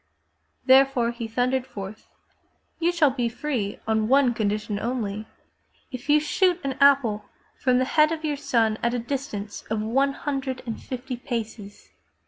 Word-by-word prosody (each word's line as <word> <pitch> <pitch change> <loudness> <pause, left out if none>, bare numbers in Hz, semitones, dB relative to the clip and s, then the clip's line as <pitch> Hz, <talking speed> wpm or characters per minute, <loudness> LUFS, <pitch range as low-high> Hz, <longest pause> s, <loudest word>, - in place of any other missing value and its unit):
Therefore 260 -2 +5
he 235 -1 -5
thundered 250 +3 0
forth: 210 -3 -8 0.7
You 340 +1 +2
shall 320 -5 +3
be 245 -3 -1
free 240 -4 -3
on 220 -1 +1
one 265 -1 +4
condition 210 -1 -1
only 220 -3 -3 0.3
— - - -39
if 255 +2 -8
you 300 +1 +6
shoot 360 +3 +2
an 275 -1 -1
apple 250 -7 +4 0.3
from 255 -2 +2
the 255 - +2
head 305 +3 +4
of 320 -1 -3
your 300 -1 0
son 225 -5 +1
at 235 +1 +1
a - - 0
distance 235 -5 -4
of 220 0 0
one 270 +6 +1
hundred 270 -3 -3
and 230 -2 -5
fifty 255 0 -5
paces!'' 220 -4 -6
250 Hz, 160 wpm, -25 LUFS, 220-275 Hz, 0.7 s, you